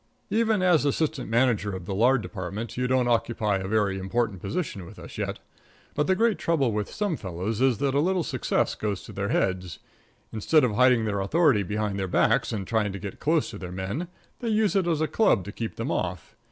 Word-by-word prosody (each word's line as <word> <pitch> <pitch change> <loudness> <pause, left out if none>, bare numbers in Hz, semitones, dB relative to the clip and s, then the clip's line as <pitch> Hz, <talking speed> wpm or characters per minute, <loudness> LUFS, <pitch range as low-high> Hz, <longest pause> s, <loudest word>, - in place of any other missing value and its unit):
Even 220 -3 +2
as 175 -5 +4
assistant 145 -2 -1
manager 115 -4 +2
of 95 -2 -7
the 95 - -4
lard 120 +4 +3
department, 100 +4 -5
you 125 0 0
don't 130 -1 +2
occupy 115 -3 +1
a 95 0 -4
very 100 -2 +1
important 95 0 -1
position 125 - -3
with 100 +4 -12
us - - -10
yet. - - -2 0.6
But 150 - 0
the 190 - +3
great 225 +1 +2
trouble 145 -8 +1
with 105 -1 -2
some 205 -5 -1
fellows 100 - -4
is 130 -4 +3
that 135 +3 0
a 140 - +3
little 180 +3 +1
success - - 0
goes 105 -3 -3
to - - -10
their 100 +1 -2
heads. 95 -2 -1 0.6
Instead 145 +8 +3
of 120 -4 +2
hiding 125 0 +4
their 100 -2 -1
authority 130 - +3
behind 105 0 -2
their 95 - -1
backs 90 - +2
and 100 -4 -3
trying 105 -1 0
to - - -4
get 100 0 -7
close 155 +1 +1
to - - -8
their 90 -1 -7
men, 95 - -3 0.3
they 235 - -2
use 215 -2 +2
it 190 -3 +2
as 160 -3 +1
a 155 - +2
club 210 - +3
to 100 - -7
keep 115 +1 -5
them 115 - -3
off. 90 +1 -3
115 Hz, 220 wpm, -26 LUFS, 100-150 Hz, 0.6 s, as